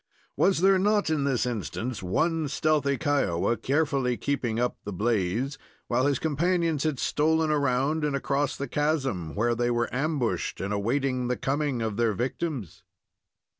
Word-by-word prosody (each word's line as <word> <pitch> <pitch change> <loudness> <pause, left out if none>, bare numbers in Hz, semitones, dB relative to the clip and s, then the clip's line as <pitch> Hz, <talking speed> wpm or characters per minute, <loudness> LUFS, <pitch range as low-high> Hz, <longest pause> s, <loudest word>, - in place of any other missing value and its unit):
Was 190 -4 +3
there 190 0 +5
not, 205 -3 +2
in 150 -3 +1
this 130 -3 +1
instance, 120 +1 -3
one 160 - 0
stealthy 140 -1 +1
Kiowa 140 - +1
carefully 135 -3 0
keeping 125 -5 -1
up 125 0 0
the 105 - -5
blaze, 110 +6 -1 0.3
while 130 +3 +2
his 140 -2 +2
companions 165 0 0
had 155 -4 0
stolen 160 +3 +1
around 145 +2 +1
and 150 -2 0
across 140 +1 0
the 140 - -3
chasm, 135 - -1
where 120 +3 +2
they 120 +1 0
were 120 -1 0
ambushed 140 -2 -1
and 100 +2 -2
awaiting 125 +4 0
the 125 0 -1
coming 140 -3 -1
of 110 -2 -3
their 115 -2 +2
victims? 125 - -3
135 Hz, 155 wpm, -27 LUFS, 120-155 Hz, 0.3 s, there